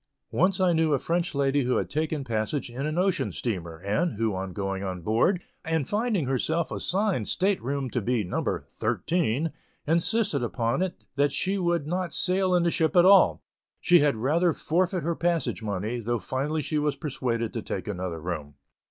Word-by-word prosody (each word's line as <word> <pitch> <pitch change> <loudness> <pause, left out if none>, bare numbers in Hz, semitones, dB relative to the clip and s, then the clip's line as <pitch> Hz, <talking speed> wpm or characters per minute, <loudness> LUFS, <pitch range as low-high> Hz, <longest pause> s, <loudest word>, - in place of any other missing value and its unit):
Once 185 +3 +2
I 185 -2 +3
knew 160 -2 +2
a - - +4
French 170 +2 -1
lady 140 0 +2
who 125 -1 +1
had - - -1
taken 155 -1 -2
passage 120 +2 -2
in 135 +5 -3
an 155 +2 -3
ocean 185 0 +1
steamer, 85 -8 -4
and 105 - -1
who, 110 0 0
on 95 0 -4
going 95 0 -3
aboard, 110 - 0 0.2
and 160 -4 -1
finding 210 - 0
her 130 0 0 0.3
assigned 190 - 0
state 195 +1 +1
room 135 +2 -2
to 125 - -1
be 120 +1 0
"No. 90 - -2 0.4
13," 160 -2 0 0.3
insisted 170 - +1
upon 120 +4 -1
it 185 -1 -1 0.2
that 145 0 +3
she 195 +7 0
would 170 -4 +1
not 180 +3 -2
sail 185 0 +2
in 175 - +3
the 170 - +2
ship 160 +3 +1
at 175 0 +7
all; 195 +1 +6 0.4
she 175 0 +5
had 145 -4 +3
rather 160 +9 +2
forfeit 180 +1 0
her 170 +2 0
passage 170 -6 0
money, 105 +3 -2
though 120 +1 -1
finally 145 +6 -2
she 155 - -1
was 150 -1 0
persuaded 120 -6 -2
to 115 - -3
take 95 - -5
another 90 -4 -3
room. 75 -4 -5
145 Hz, 185 wpm, -27 LUFS, 115-175 Hz, 0.4 s, at